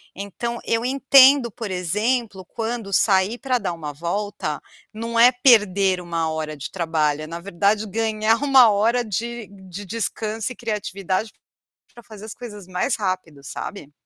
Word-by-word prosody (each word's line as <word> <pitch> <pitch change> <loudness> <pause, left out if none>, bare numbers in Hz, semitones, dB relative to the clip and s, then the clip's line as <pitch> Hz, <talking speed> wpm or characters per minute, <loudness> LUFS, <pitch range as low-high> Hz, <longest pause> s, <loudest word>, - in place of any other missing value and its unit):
Então 200 +5 -5
eu 230 +1 0
entendo, 270 -1 +5
por 220 -1 -6
exemplo, 205 +3 -1
quando 225 -1 -5
sair 195 +4 +3
para 255 -1 0
dar 180 -4 -3
uma 155 -3 -6
volta, 200 +7 -3 0.3
não 230 +1 -3
é 245 +2 +8
perder 200 -7 +4
1 165 -2 -2
hora 155 -1 -4
de 140 - -7
trabalho, 155 -3 -1
na 170 +1 -6
verdade 200 +3 0
ganhar 220 +1 +1
1 265 -5 +7
hora 230 +4 +2
de 230 +2 -4 0.2
de 200 +3 -7
descanso 220 +2 -3
e - - -21
criatividade, 210 -2 -3 0.6
para 240 - -13
fazer 215 -1 -12
as 220 - -7
coisas 210 -6 -10
mais 185 +8 -1
rápido, 185 -8 -4
sabe? 150 0 -7
210 Hz, 150 wpm, -22 LUFS, 185-230 Hz, 0.6 s, é